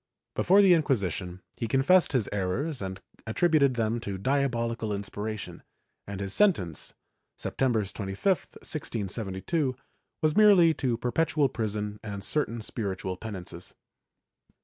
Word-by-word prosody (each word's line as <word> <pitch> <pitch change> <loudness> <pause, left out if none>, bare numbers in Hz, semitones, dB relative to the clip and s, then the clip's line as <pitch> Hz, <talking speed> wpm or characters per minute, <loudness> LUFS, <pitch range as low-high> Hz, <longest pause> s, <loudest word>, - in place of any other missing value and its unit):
Before 195 +3 +5
the 190 -2 +7
Inquisition 95 - 0
he 115 - -3
confessed 135 +10 +4
his 125 -8 +1
errors 105 - -2
and 95 -1 -5 0.3
attributed 140 +1 +3
them 115 0 0
to 100 -4 -5
diabolical 115 -2 0
inspiration, 105 +1 -5 0.5
and 100 -1 -5
his 100 0 -3
sentence, 100 - +1 0.4
Septem 130 -1 0
ber 110 -2 +2
25, 95 0 -7
1672, 130 - -1 0.5
was 155 -1 +3
merely 195 -6 +7
to 125 -6 -1
perpetual 140 +4 +1
prison 105 -3 -3
and 100 -2 -5
certain 120 -1 -1
spiritual 95 -4 -3
penances. 90 -4 -8
115 Hz, 120 wpm, -28 LUFS, 100-145 Hz, 0.5 s, the